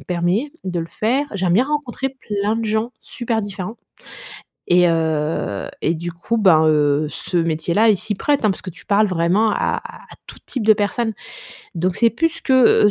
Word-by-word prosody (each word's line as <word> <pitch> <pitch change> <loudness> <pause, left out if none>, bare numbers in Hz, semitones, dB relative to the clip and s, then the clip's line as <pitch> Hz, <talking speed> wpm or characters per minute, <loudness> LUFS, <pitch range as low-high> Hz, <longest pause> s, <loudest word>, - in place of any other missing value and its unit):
permet 180 - -1
de 180 -2 -2
le 165 - -4
faire. 255 +11 0
J'aime 185 -3 0
bien 235 +7 +4
rencontrer 280 -3 -2
plein 215 -4 -2
de 230 - -2
gens, 220 +3 -1
super 230 -2 -3
différents 200 +2 -6 0.9
et 180 0 +5
heu, 160 -9 -1 0.2
et 165 - +2
du 170 +2 -5
coup 180 +7 -3
ben 165 -6 +5
heu, 150 -1 +2
ce 175 +3 -4
métier 165 0 -1
là, 220 +2 +5
il 215 - +5
s'y 210 +2 -3
prête, 285 +4 0
hein, 215 - +4
parce 190 - -3
que 185 - -6
tu - - -16
parles 210 +1 +4
vraiment 185 +5 +2
à - - -1 0.2
à - - -7 0.2
à - - -11
tout - - -12
type 240 -5 -3
de 220 - +7
personnes. 215 +2 -1 0.6
Donc 175 +2 -1
c'est 230 -1 +4
plus 330 +7 -1
que 255 -5 +5
200 Hz, 195 wpm, -20 LUFS, 170-230 Hz, 0.9 s, de